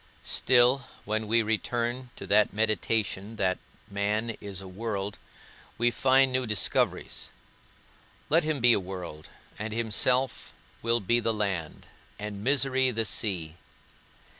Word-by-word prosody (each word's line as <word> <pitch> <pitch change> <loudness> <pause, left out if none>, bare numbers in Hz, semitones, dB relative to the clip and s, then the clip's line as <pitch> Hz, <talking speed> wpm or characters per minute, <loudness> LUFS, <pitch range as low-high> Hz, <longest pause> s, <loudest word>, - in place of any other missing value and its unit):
Still 130 +1 +4 0.2
when 110 +1 -1
we 115 +1 +3
return 120 +3 -2
to - - -7
that 105 +1 +4
meditation 110 -1 0
that 95 -3 0 0.3
man 105 +3 -1
is 100 -3 -6
a 95 - -9
world, 100 0 -4 0.6
we 120 +1 +2
find 135 +1 +4
new 130 -1 0
discoveries. 105 -4 +1 1.0
Let 165 +3 +3
him 155 -4 -1
be 120 0 +7
a - - +3
world, 90 -5 -8 0.3
and 110 +1 -4
himself 115 +4 +1 0.3
will 115 0 +2
be 120 +5 +2
the 115 -1 0
land, 95 -7 -3 0.3
and 105 -1 -6
misery 130 0 +2
the 115 -2 -1
sea. 90 -7 -1
110 Hz, 130 wpm, -28 LUFS, 100-120 Hz, 1.0 s, be